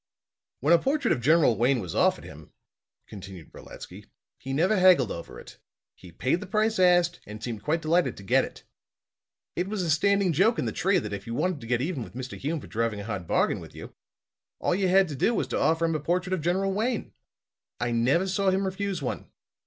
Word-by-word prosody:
"When 150 +6 +4
a 170 - +6
portrait 275 - 0
of 120 - +1
General 150 -2 +4
Wayne 125 +4 +2
was 90 -6 -6
offered - - +2
him," 75 +1 -12 0.6
continued 95 -4 -11
Brolatsky, - - -11 0.3
"he 135 - -7
never 175 +10 +2
haggled 180 - +5
over 85 - -8
it. - - -14 0.3
He 90 - -15
paid 130 - 0
the - - -8
price 215 +1 0
asked 175 -1 +4
and 105 +1 -9
seemed 115 -3 -5
quite 160 +8 -1
delighted 160 -5 +1
to 100 - -10
get 95 - +3
it. - - -9 0.9
It 175 +2 -1
was 205 -2 -2
a 165 - 0
standing 200 +3 +2
joke 210 - +3
in - - -1
the - - -1
trade 190 -5 +1
that 105 -1 -5
if 100 - -7
you 115 - -4
wanted 180 -3 -1
to 115 - -9
get 120 0 0
even 150 -1 -2
with 115 - -9
Mr. 130 0 -6
Hume 155 +4 -3
for - - -11
driving 115 -2 -2
a - - -6
hard 100 -5 -5
bargain - - +1
with - - -12
you, - - -10 0.6
all - - 0
you 190 +1 +1
had 190 +1 +4
to 145 - -5
do 230 - +1
was - - 0
to - - -1
offer 165 +1 +2
him 165 - 0
a 155 - -1
portrait 180 +5 -1
of 185 - -1
General 190 +4 0
Wayne. 225 +3 -2 0.7
I 120 0 -1
never 125 +10 +2
saw 190 +1 +1
him 190 +1 +1
refuse 190 -3 -3
one. 125 - -4
165 Hz, 225 wpm, -26 LUFS, 120-190 Hz, 0.9 s, a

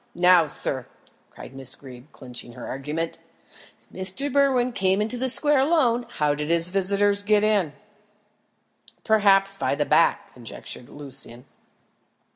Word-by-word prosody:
Now, 180 -2 +5
sir," 130 -3 -1 0.4
cried - - -12
Miss 135 -1 -2
Greeb, 130 +1 -14
clinching 125 -1 -8
her 125 - -9
argument, 150 +5 -5 0.6
"if - - -29 0.2
Mr. 275 +8 -4
Berwin 265 -3 +2
came 190 -3 0
into 220 +4 -1
the 260 +2 0
square 295 +2 +4
alone, 260 -5 +1
how 150 -1 0
did 150 +1 -4
his 170 +1 +1
visitors 200 +1 +2
get 210 0 +2
in?" 205 -8 +1 1.3
"Perhaps 195 -3 +3
by 140 - -1
the 145 +1 -1
back," 155 +4 +2
conjectured 120 +1 -8
Lucian. 130 -4 -8
185 Hz, 135 wpm, -24 LUFS, 145-215 Hz, 1.3 s, Now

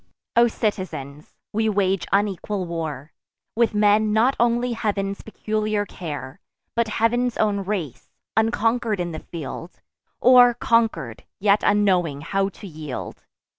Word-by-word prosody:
O 235 0 +6
citizens, 185 - -4 0.2
we 220 +1 +1
wage 195 -2 +1
unequal 200 -1 0
war, 160 -4 -5 0.4
With 230 -1 +2
men 210 +1 +4
not 235 +5 +3
only 240 +1 +2
Heav'n's 200 -3 -2
peculiar 215 -1 -2
care, 150 -5 -7 0.4
But 235 -1 +2
Heav'n's 240 +3 +1
own 205 -2 +1
race; 190 - -4 0.3
unconquer'd 225 -1 +1
in 175 -1 -2
the 155 - -5
field, 165 +2 -8 0.4
Or, 245 -1 +7
conquer'd, 225 - 0 0.2
yet 205 +1 +3
unknowing 180 -8 +2
how 195 +4 0
to 200 - -13
yield. 155 -6 -7
205 Hz, 125 wpm, -23 LUFS, 175-225 Hz, 0.4 s, Or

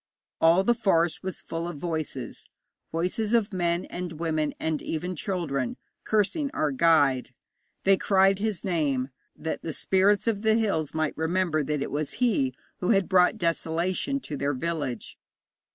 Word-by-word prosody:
All 170 +3 +5
the 240 - +4
forest 175 -8 +1
was 190 0 -4
full 165 +1 -4
of 175 -3 -6
voices 155 -6 -4 0.4
voices 185 +7 0
of 220 -2 +1
men 175 -1 0
and 175 -1 -5
women 155 -2 -1
and 160 -2 -1
even 180 +3 -3
children 150 -8 -2 0.3
cursing 220 - +1
our 150 - +1
guide. 140 -3 +3 0.5
They 195 0 +5
cried 195 0 +3
his 215 -3 -2
name, 145 -8 0 0.3
that 160 - -4
the 160 - -4
spirits 195 +5 +2
of 220 -3 0
the 220 0 +3
hills 195 -11 0
might 155 -1 0
remember 160 -1 0
that 150 -1 -1
it - - -5
was 145 0 -2
he 165 - +1 0.2
who 180 - -2
had 195 -4 +3
brought 180 -1 +4
desolation 170 +9 0
to 150 - -5
their 140 0 -1
village. 145 -5 -4
170 Hz, 155 wpm, -27 LUFS, 155-195 Hz, 0.5 s, All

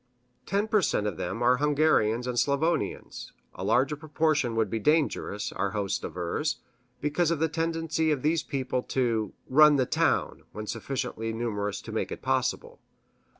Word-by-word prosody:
Ten 200 +2 0
per 215 -1 +3
cent 105 - 0
of 100 -6 -2
them 115 +7 -3
are 125 +1 +4
Hungarians 145 -6 +2
and 125 -1 -2
Slavonians 145 +6 -1 0.2
a - - -7
larger 135 +4 +2
proportion 150 -4 0
would 110 -1 +2
be 110 +3 -2
dangerous, 140 -7 0
our 100 +2 -2
host 100 -2 -1
avers, 90 - -2 0.4
because 150 +3 +1
of 170 - +1
the 160 +2 +1
tendency 160 0 -1
of 145 -4 0
these 160 +1 +2
people 130 -2 -2 0.2
to 115 -5 +1 0.2
"run 150 +2 +7
the 130 -2 +2
town" - - 0
when 105 - -6
sufficiently 115 -1 -3
numerous 105 -3 -2
to - - -8
make - - -2
it - - -7
possible. - - -1
135 Hz, 160 wpm, -28 LUFS, 115-155 Hz, 0.4 s, run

